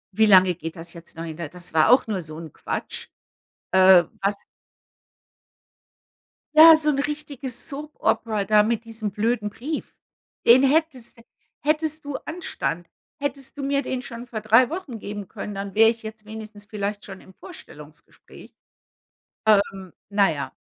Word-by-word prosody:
Wie 220 Hz, +1 st, +4 dB
lange 185 Hz, -2 st, +6 dB
geht 165 Hz, -1 st, -7 dB
das 170 Hz, 0 st, -9 dB
jetzt 170 Hz, -1 st, -13 dB
noch 165 Hz, -, -5 dB
hin? 160 Hz, -1 st, -7 dB
Da 170 Hz, -, -5 dB
das 180 Hz, +2 st, -10 dB
war 155 Hz, -1 st, +4 dB
auch 255 Hz, -, +5 dB
nur 210 Hz, -5 st, -3 dB
so 155 Hz, -1 st, -8 dB
'n 160 Hz, -3 st, -9 dB
Quatsch. -, -, -5 dB, 0.6 s
Äh, 185 Hz, -1 st, +7 dB, 0.2 s
was 200 Hz, +1 st, 0 dB, 2.1 s
Ja, 320 Hz, +1 st, +10 dB
so 305 Hz, -1 st, +1 dB
'n 275 Hz, -, -1 dB
richtiges 285 Hz, -4 st, -4 dB
Soap 300 Hz, +1 st, -8 dB
Opera 215 Hz, -3 st, 0 dB
da 210 Hz, +1 st, +4 dB
mit 230 Hz, +1 st, -1 dB
diesem 225 Hz, -2 st, -5 dB
blöden 215 Hz, 0 st, -1 dB
Brief. 290 Hz, +9 st, -6 dB, 0.5 s
Den 245 Hz, +3 st, +7 dB
hättest 275 Hz, -4 st, 0 dB, 0.4 s
hättest 310 Hz, 0 st, -1 dB
du 285 Hz, -1 st, -4 dB
Anstand, 175 Hz, -, -4 dB, 0.3 s
hättest 280 Hz, -1 st, -5 dB
du 280 Hz, -, -5 dB
mir 280 Hz, 0 st, +1 dB
den 255 Hz, -2 st, -4 dB
schon 245 Hz, -3 st, -8 dB
vor 230 Hz, -2 st, -5 dB
3 225 Hz, +4 st, +5 dB
Wochen 310 Hz, -, -6 dB
geben 205 Hz, -1 st, -7 dB
können, 205 Hz, -, -7 dB
dann 195 Hz, 0 st, -5 dB
wäre 225 Hz, +1 st, +6 dB
ich 230 Hz, 0 st, -4 dB
jetzt 220 Hz, -1 st, -9 dB
wenigstens 215 Hz, -1 st, -9 dB
vielleicht 205 Hz, 0 st, -4 dB
schon 195 Hz, -1 st, -10 dB
im 190 Hz, -, -17 dB
Vorstellungsgespräch. 355 Hz, -, -14 dB, 0.9 s
Ähm, 200 Hz, -3 st, +2 dB, 0.2 s
na 200 Hz, -3 st, +3 dB
ja. 140 Hz, -3 st, -5 dB
220 Hz, 160 wpm, -23 LUFS, 195-275 Hz, 2.1 s, Ja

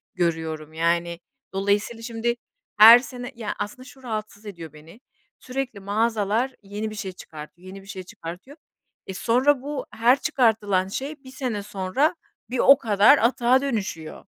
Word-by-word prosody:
görüyorum 160 Hz, -3 st, -2 dB
yani. 170 Hz, +1 st, 0 dB, 0.3 s
Dolayısıyla 205 Hz, +4 st, 0 dB
şimdi 235 Hz, 0 st, -2 dB, 0.4 s
her 225 Hz, +3 st, +11 dB
sene 245 Hz, 0 st, -8 dB
Ya 225 Hz, -3 st, -5 dB
aslında 230 Hz, +5 st, -5 dB
şu 265 Hz, -1 st, -16 dB
rahatsız 215 Hz, -3 st, -6 dB
ediyor 170 Hz, -6 st, -9 dB
beni, 160 Hz, +9 st, -15 dB, 0.4 s
sürekli 255 Hz, -4 st, -5 dB
mağazalar 220 Hz, +4 st, 0 dB
yeni 205 Hz, +2 st, -5 dB
bir 215 Hz, -, -9 dB
şey 195 Hz, -3 st, -5 dB
çıkartıyor, 165 Hz, 0 st, -12 dB
yeni 195 Hz, +1 st, -9 dB
bir 195 Hz, -, -18 dB
şey 190 Hz, -2 st, -7 dB
çıkartıyor. 180 Hz, -, -10 dB, 0.5 s
E, 190 Hz, -, -5 dB
sonra 255 Hz, +7 st, +2 dB
bu 285 Hz, +1 st, -5 dB
her 245 Hz, +4 st, +3 dB
çıkartılan 215 Hz, -9 st, +1 dB
şey 275 Hz, +8 st, -6 dB
1 260 Hz, -, -12 dB
sene 250 Hz, -6 st, -4 dB
sonra 200 Hz, -, 0 dB, 0.3 s
bir 250 Hz, 0 st, -3 dB
o 275 Hz, +3 st, +7 dB
kadar 215 Hz, +5 st, +5 dB
atığa 245 Hz, +2 st, +3 dB
dönüşüyor. 200 Hz, -, -4 dB
215 Hz, 150 wpm, -24 LUFS, 185-250 Hz, 0.5 s, her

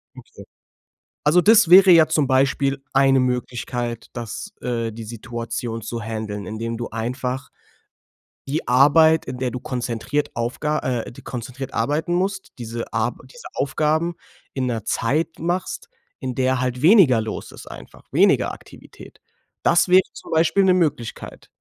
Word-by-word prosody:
Okay. -, -, -13 dB, 0.8 s
Also, 155 Hz, +4 st, +4 dB
des 215 Hz, -2 st, +5 dB
wäre 185 Hz, +1 st, +8 dB
ja 165 Hz, -2 st, +7 dB
zum 155 Hz, -3 st, +1 dB
Beispiel 135 Hz, +1 st, +1 dB
eine 135 Hz, 0 st, +4 dB
Möglichkeit, 120 Hz, -1 st, -3 dB
dass, 120 Hz, -, -7 dB
äh, 115 Hz, -2 st, -2 dB
die 115 Hz, +1 st, -8 dB
Situation 115 Hz, +1 st, -5 dB
zu 115 Hz, +2 st, -5 dB
handeln, 105 Hz, -2 st, -5 dB
indem 115 Hz, +3 st, -4 dB
du 120 Hz, -, -5 dB
einfach 125 Hz, +3 st, -4 dB, 1.0 s
die 145 Hz, +3 st, -3 dB
Arbeit, 155 Hz, +5 st, +5 dB
in 125 Hz, 0 st, -6 dB
der 125 Hz, -1 st, -1 dB
du 125 Hz, -, -5 dB
konzentriert 125 Hz, +4 st, -3 dB
Aufga 135 Hz, +6 st, -1 dB, 0.3 s
äh, -, -, -9 dB
konzentriert 130 Hz, +2 st, -6 dB
arbeiten 150 Hz, +9 st, -1 dB
musst, 190 Hz, +1 st, -2 dB
diese 115 Hz, 0 st, -6 dB
Ar 115 Hz, +2 st, 0 dB
diese 485 Hz, -1 st, -14 dB
Aufgaben 155 Hz, +5 st, 0 dB, 0.4 s
in 130 Hz, -2 st, -2 dB
'ner 115 Hz, -4 st, -3 dB
Zeit 150 Hz, +10 st, -1 dB
machst, 175 Hz, +3 st, -3 dB, 0.3 s
in 130 Hz, -1 st, -4 dB
der 130 Hz, 0 st, +1 dB
halt 125 Hz, 0 st, -2 dB
weniger 165 Hz, -, +6 dB
los 110 Hz, 0 st, -6 dB
ist -, -, -12 dB
einfach, -, -, -12 dB
weniger -, -, +3 dB
Aktivität. -, -, -14 dB, 0.4 s
Das 175 Hz, +2 st, +3 dB
wäre 185 Hz, +1 st, +6 dB
zum -, -, -12 dB
Beispiel 165 Hz, +5 st, +3 dB
'ne 185 Hz, -1 st, +4 dB
Möglichkeit. 150 Hz, -10 st, -3 dB
130 Hz, 145 wpm, -22 LUFS, 115-160 Hz, 1.0 s, wäre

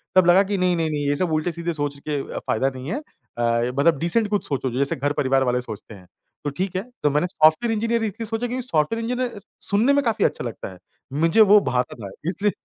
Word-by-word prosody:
तब 185 Hz, -1 st, +6 dB
लगा 175 Hz, +2 st, +6 dB
कि 200 Hz, 0 st, -2 dB
नहीं-नहीं, 175 Hz, -3 st, +1 dB
नहीं 145 Hz, -1 st, -2 dB
ये 145 Hz, -, +2 dB
सब 175 Hz, +2 st, -1 dB
उल्टे-सीधे 170 Hz, +2 st, -1 dB
सोच 145 Hz, -2 st, -3 dB
के 145 Hz, -2 st, -1 dB, 0.2 s
फ़ायदा 130 Hz, +5 st, 0 dB
नहीं 130 Hz, +4 st, -7 dB
है 235 Hz, -, -1 dB
अ, 120 Hz, -, -2 dB
मतलब 160 Hz, +2 st, +4 dB
डिसेंट 190 Hz, +8 st, +2 dB
कुछ 205 Hz, -1 st, 0 dB
सोचो, 135 Hz, -3 st, -2 dB
जैसे 135 Hz, +3 st, 0 dB
घर 145 Hz, +2 st, -1 dB
परिवार 135 Hz, -1 st, +2 dB
वाले 125 Hz, -1 st, +1 dB
सोचते 110 Hz, -2 st, -9 dB
हैं। 90 Hz, -2 st, -16 dB, 0.4 s
तो 145 Hz, -, -1 dB
ठीक 185 Hz, +6 st, -3 dB
है। 185 Hz, -, 0 dB, 0.2 s
तो 150 Hz, -, +4 dB
मैंने 150 Hz, +5 st, +1 dB
सॉफ्टवेयर 160 Hz, +7 st, +3 dB
इंजीनियर 230 Hz, +1 st, 0 dB
इसलिए 220 Hz, +2 st, -3 dB
सोचा 225 Hz, +2 st, -1 dB
क्योंकि 250 Hz, +1 st, -4 dB
सॉफ्टवेयर 165 Hz, +8 st, 0 dB
इंजीनियर 245 Hz, -2 st, -2 dB, 0.3 s
सुनने 220 Hz, +7 st, +3 dB
में 285 Hz, 0 st, +2 dB
काफ़ी 225 Hz, -2 st, +2 dB
अच्छा -, -, -1 dB
लगता 115 Hz, -4 st, -6 dB
है। -, -, -14 dB, 0.4 s
मुझे 165 Hz, +7 st, +4 dB
वो 210 Hz, 0 st, +7 dB
भाता 125 Hz, 0 st, -1 dB
था 100 Hz, -, -6 dB, 0.2 s
इसलिए 200 Hz, +3 st, 0 dB
165 Hz, 225 wpm, -23 LUFS, 140-210 Hz, 0.4 s, वो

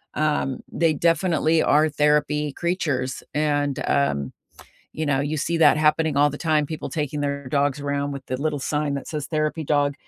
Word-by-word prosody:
um, 150 Hz, -3 st, 0 dB
they 165 Hz, -2 st, +2 dB
definitely 165 Hz, 0 st, +2 dB
are 155 Hz, +2 st, +4 dB
therapy 150 Hz, 0 st, +1 dB
creatures 150 Hz, -8 st, -2 dB
and, 145 Hz, -2 st, 0 dB
um, 70 Hz, -, 0 dB, 0.6 s
you 155 Hz, -, -2 dB
know, 135 Hz, -2 st, +1 dB
you 145 Hz, +2 st, -2 dB
see 170 Hz, +4 st, -1 dB
that 165 Hz, -, +6 dB
happening 155 Hz, -1 st, +2 dB
all 145 Hz, +1 st, +4 dB
the 145 Hz, -, -7 dB
time, 155 Hz, -2 st, +1 dB
people 155 Hz, +1 st, -6 dB
taking 150 Hz, -2 st, -3 dB
their 140 Hz, -2 st, -3 dB
dogs 145 Hz, +1 st, 0 dB
around 140 Hz, 0 st, -2 dB
with 140 Hz, -1 st, -7 dB
the 130 Hz, +1 st, -4 dB
little 150 Hz, 0 st, -1 dB
sign 150 Hz, +1 st, -1 dB
that 140 Hz, -, -5 dB
says 150 Hz, -3 st, -4 dB
"therapy 155 Hz, 0 st, -1 dB
dog." 145 Hz, -1 st, +1 dB
150 Hz, 180 wpm, -23 LUFS, 140-155 Hz, 0.6 s, that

